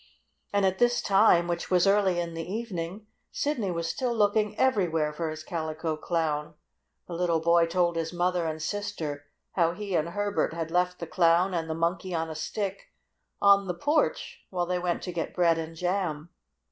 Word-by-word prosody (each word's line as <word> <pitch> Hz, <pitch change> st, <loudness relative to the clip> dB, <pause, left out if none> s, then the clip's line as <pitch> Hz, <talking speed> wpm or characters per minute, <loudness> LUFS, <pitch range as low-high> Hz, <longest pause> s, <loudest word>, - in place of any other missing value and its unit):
And 200 Hz, -1 st, +2 dB
at 190 Hz, 0 st, +1 dB
this 240 Hz, 0 st, +3 dB
time, 195 Hz, -4 st, +4 dB
which 170 Hz, 0 st, -3 dB
was 180 Hz, 0 st, +4 dB
early 195 Hz, -3 st, +3 dB
in 170 Hz, -1 st, -3 dB
the 165 Hz, +2 st, -5 dB
evening, 200 Hz, -3 st, -4 dB, 0.3 s
Sidney 285 Hz, -9 st, -1 dB
was 170 Hz, -1 st, -2 dB
still 240 Hz, +7 st, -1 dB
looking 210 Hz, 0 st, +2 dB
everywhere 170 Hz, -12 st, +2 dB
for 160 Hz, +1 st, -3 dB
his 155 Hz, 0 st, -6 dB
Calico 160 Hz, -1 st, -3 dB
Clown. 155 Hz, -2 st, -2 dB, 0.5 s
The 175 Hz, -, -7 dB
little 170 Hz, -1 st, +1 dB
boy 170 Hz, +1 st, +4 dB
told 170 Hz, 0 st, +1 dB
his 165 Hz, 0 st, -2 dB
mother 175 Hz, -1 st, 0 dB
and 155 Hz, 0 st, -3 dB
sister 160 Hz, -6 st, -4 dB, 0.2 s
how 170 Hz, -2 st, +2 dB
he 200 Hz, +1 st, -5 dB
and 165 Hz, 0 st, +1 dB
Herbert 205 Hz, -1 st, -1 dB
had 165 Hz, -1 st, -4 dB
left 180 Hz, +1 st, +1 dB
the 170 Hz, -, -5 dB
Clown 175 Hz, +2 st, +3 dB
and 165 Hz, -2 st, -2 dB
the 160 Hz, -, -2 dB
Monkey 170 Hz, +2 st, -1 dB
on 160 Hz, 0 st, -2 dB
a -, -, -6 dB
Stick 195 Hz, +5 st, -4 dB, 0.6 s
on 200 Hz, -1 st, +6 dB
the 180 Hz, -, -2 dB
porch 305 Hz, -, 0 dB
while 180 Hz, -2 st, -1 dB
they 180 Hz, 0 st, -1 dB
went 175 Hz, -1 st, -1 dB
to 180 Hz, -, -4 dB
get 165 Hz, -1 st, -4 dB
bread 170 Hz, -2 st, +3 dB
and 165 Hz, 0 st, -6 dB
jam. 175 Hz, -3 st, -2 dB
175 Hz, 185 wpm, -28 LUFS, 165-195 Hz, 0.6 s, on